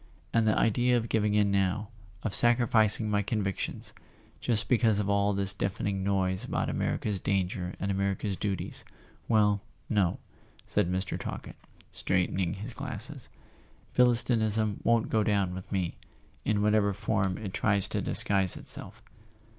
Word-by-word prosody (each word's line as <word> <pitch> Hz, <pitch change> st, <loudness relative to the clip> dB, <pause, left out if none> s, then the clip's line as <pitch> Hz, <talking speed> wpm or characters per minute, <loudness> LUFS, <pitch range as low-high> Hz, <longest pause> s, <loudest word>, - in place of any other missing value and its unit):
And 115 Hz, -1 st, +3 dB
the 110 Hz, -, +3 dB
idea 120 Hz, +3 st, +3 dB
of 115 Hz, -1 st, -3 dB
giving 105 Hz, -1 st, +1 dB
in 105 Hz, -1 st, +3 dB
now, 100 Hz, +2 st, 0 dB, 0.3 s
of 110 Hz, -, -2 dB
sacrificing 115 Hz, -2 st, +3 dB
my 105 Hz, -1 st, +1 dB
convictions, 100 Hz, -2 st, -3 dB, 0.5 s
just 115 Hz, -2 st, 0 dB
because 115 Hz, -4 st, +3 dB
of 100 Hz, -1 st, 0 dB
all 100 Hz, 0 st, +2 dB
this 100 Hz, -1 st, +1 dB
deafening 100 Hz, 0 st, -2 dB
noise 95 Hz, -1 st, 0 dB
about -, -, -2 dB
America's 105 Hz, -3 st, -1 dB
danger 90 Hz, -1 st, -1 dB
and 100 Hz, -, -1 dB
America's 100 Hz, +1 st, -1 dB
duties—well, 105 Hz, +2 st, -2 dB, 0.3 s
no," 100 Hz, -5 st, +2 dB, 0.5 s
said 90 Hz, -, 0 dB
Mr. 95 Hz, +1 st, -2 dB
Talkett, -, -, -6 dB, 0.4 s
straightening 95 Hz, 0 st, 0 dB
his 105 Hz, +5 st, -7 dB
glasses, -, -, -6 dB, 0.7 s
"Philis¬ 120 Hz, -1 st, +5 dB
tinism 110 Hz, -3 st, +1 dB
won't 115 Hz, -1 st, +2 dB
go 110 Hz, -, +2 dB
down 100 Hz, -4 st, +1 dB
with 95 Hz, 0 st, -8 dB
me, 95 Hz, -4 st, -2 dB, 0.5 s
in 105 Hz, -1 st, +1 dB
whatever 105 Hz, -2 st, +2 dB
form 105 Hz, -3 st, 0 dB
it 100 Hz, -4 st, -6 dB
tries 100 Hz, -2 st, +1 dB
to -, -, -1 dB
disguise 95 Hz, -3 st, +3 dB
itself." -, -, -7 dB
100 Hz, 140 wpm, -29 LUFS, 95-110 Hz, 0.7 s, Philis¬